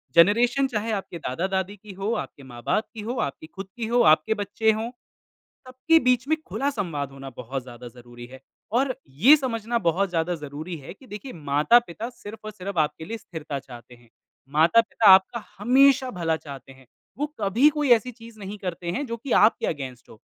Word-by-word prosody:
Generation 235 +10 +4
चाहे 225 -3 -3
आपके 195 -4 -4
दादा-दादी 190 +7 -2
की 210 +1 -12
हो, 195 +4 -2
आपके 175 -10 -5
माँ-बाप 125 - -2
की 220 - -7
हो, 225 +4 -4
आपकी 140 +3 -4
खुद 195 +3 -9
की 230 -2 -3
हो, 240 +1 +3
आपके 155 +5 +4
बच्चे 205 +2 +1
हों। 220 +2 -3 0.8
सबके 260 +6 +3
बीच 250 -1 +2
में 315 - +3
खुला 280 +1 -1
संवाद 165 - -3
होना 135 0 -9
बहुत 130 +2 -5
ज़्यादा 120 -1 -10
ज़रूरी 120 0 -13
है 130 - -11 0.3
और 255 +2 +1
ये 195 - +6
समझना 235 -4 -2
बहुत 190 0 +1
ज़्यादा 170 +1 0
ज़रूरी 155 +2 -7
है 140 - -10
कि 260 - -19
देखिए 245 +4 -8
माता-पिता 170 +9 +2
सिर्फ़ 225 -3 -11
और 215 - -5
सिर्फ़ 200 -3 -6
आपके 155 +1 0
लिए 225 +7 -5
स्थिरता 155 -8 -6
चाहते 125 -2 -13
हैं, 120 -1 -21 0.4
माता-पिता 205 +9 +4
आपका 205 +4 +1
हमेशा 260 +4 +4
भला 165 -6 -1
चाहते 140 -4 -11
हैं। 130 -1 -19 0.3
वो 295 - 0
कभी 215 +8 +4
कोई 295 -3 -1
ऐसी 240 +2 +3
चीज़ 230 -1 -14
नहीं 205 +1 -7
करते 180 -3 -4
हैं, 270 +11 -2
जो 230 -1 -4
कि 240 +2 -5
आपके 220 - +4
अगेंस्ट 130 -5 -5
हो। 110 - -15
200 Hz, 190 wpm, -25 LUFS, 150-235 Hz, 0.8 s, ये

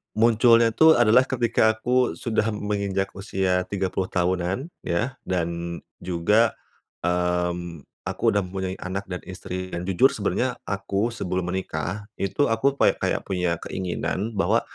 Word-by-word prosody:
munculnya 115 +1 +5
tuh 160 +8 +6
adalah 120 +3 +6
ketika 115 -3 +2
aku 125 -1 +1
sudah 110 +2 -1
menginjak 100 -2 -1
usia 95 -2 0
30 95 -1 -1
tahunan, 90 - -1 0.2
ya, 120 +10 -1
dan 85 -1 -2 0.2
juga, 95 +6 +2 0.5
mmm, 90 -2 -1 0.2
aku - - -5
udah 100 - +2
mempunyai 95 0 -4
anak 95 +2 -4
dan 90 - -2
istri 95 0 -6
dan 85 - -2
jujur 95 -1 +3
sebenarnya - - -1
aku 100 +3 -1
sebelum 90 -5 -3
menikah 95 +2 -3 0.2
itu 100 +9 +1
aku 135 +5 +1
pay - - +4
kayak - - 0
punya 90 -3 0
keinginan, 95 +3 -2
bahwa 100 - +3
95 Hz, 135 wpm, -24 LUFS, 90-110 Hz, 0.5 s, tuh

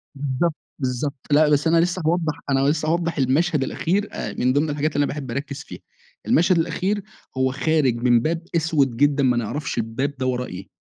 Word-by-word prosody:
بالضبط، 145 +4 -1 0.2
بالضبط 130 +1 -2
،لأ 150 +1 +5
بس 145 +2 +2
أنا 165 +1 +4
لسّه 180 +2 0
هاوضح 160 -1 0
أنا 135 -1 +3
لسّه 155 +1 0
هاوضح 170 0 0
المشهد 145 +3 +2
الأخير 195 +9 -1
آآ، - - -4
من 125 +1 +1
ضمن 145 +3 +1
الحاجات 150 +1 -1
اللي 145 - +3
أنا 140 - -2
باحب 140 -4 -6
أركز 140 +2 -5
فيها، - - -10 0.5
المشهد 175 +2 +4
الأخير 185 +5 -1 0.3
هو 130 0 +2
خارج 145 -2 +1
من 120 0 +3
باب 165 +7 -1
أسود 150 -7 +1
جدًا، 145 0 +3
ما 125 -2 +3
نعرفش 145 +7 -3
الباب 115 +5 -2
ده 130 - -2
وراه 125 -1 -1
إيه. 95 -1 -8
145 Hz, 195 wpm, -22 LUFS, 130-160 Hz, 0.5 s, لأ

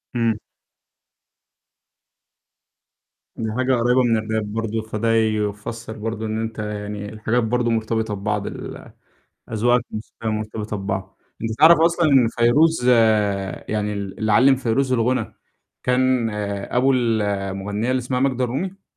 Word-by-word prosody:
إمم. 115 -2 +1 3.0
دي 110 -1 -3
حاجة 130 +3 +1
قريّبة 125 +2 +3
من 115 -2 +3
الراب 110 -1 -3
برضه، 115 0 -2
فده 110 +1 -1
يفسر 110 +1 -1
برضه 110 0 -4
إن 110 0 -2
أنت 115 0 -5
يعني 105 -1 -5
الحاجات 110 +2 0
برضه 120 +1 0
مرتبطة 110 -1 -1
ببعض 105 0 -2
ال - - -8 0.6
أذواقك 120 +2 +2
الموسيقية 110 +1 -6
مرتبطة 110 0 -3
ببعض. 95 -1 -4 0.2
أنت 115 - -2
تعرف 160 +1 +7
أصلًا 170 0 +3
إن 125 -4 +5
فيروز 125 +4 +3 0.8
يعني 105 -1 -1
ال 100 -1 -5
اللي 110 -1 0
علِّم 130 +5 +5
فيروز 130 +1 0
الغُنى 125 +1 0 0.5
كان 125 -2 +2 0.4
أبو 130 +2 +3
ال 115 -4 +1
المُغنّية 100 +3 -2
اللي 130 - +2
اسمها 125 +1 -2
ماجدة 130 -2 +1
الرومي؟ 180 +11 -4
115 Hz, 130 wpm, -22 LUFS, 105-125 Hz, 3.0 s, تعرف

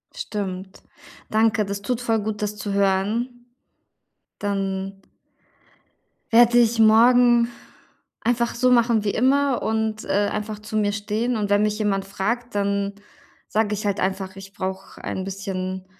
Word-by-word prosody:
Stimmt. 190 -2 -5 0.5
Danke, 220 0 +2
das 200 0 -4
tut 245 +3 -2
voll 225 -2 +1
gut, 210 0 -4
das 210 0 -2
zu 205 -1 -4
hören. 210 +6 0 0.9
Dann 195 -1 -3 1.3
werde 240 +1 +6
ich 235 -1 +4
morgen 235 +2 +6 0.7
einfach 235 0 0
so 255 +1 +2
machen 235 -3 +3
wie 205 - +2
immer 270 +3 +2
und, 220 -1 -1
äh, 205 +1 +1
einfach 210 0 -4
zu 210 +1 -8
mir 210 -1 +2
stehen. 215 +3 -1
Und 205 -2 -2
wenn 205 0 +3
mich 210 0 0
jemand 200 -2 0
fragt, 230 +5 -3
dann 200 0 0 0.5
sage 215 -1 0
ich 210 0 -4
halt 200 -1 0
einfach: 190 0 -2
„Ich 195 0 -11
brauche 190 0 -6
ein 190 - -3
bisschen 190 -1 -4
210 Hz, 145 wpm, -23 LUFS, 195-230 Hz, 1.3 s, werde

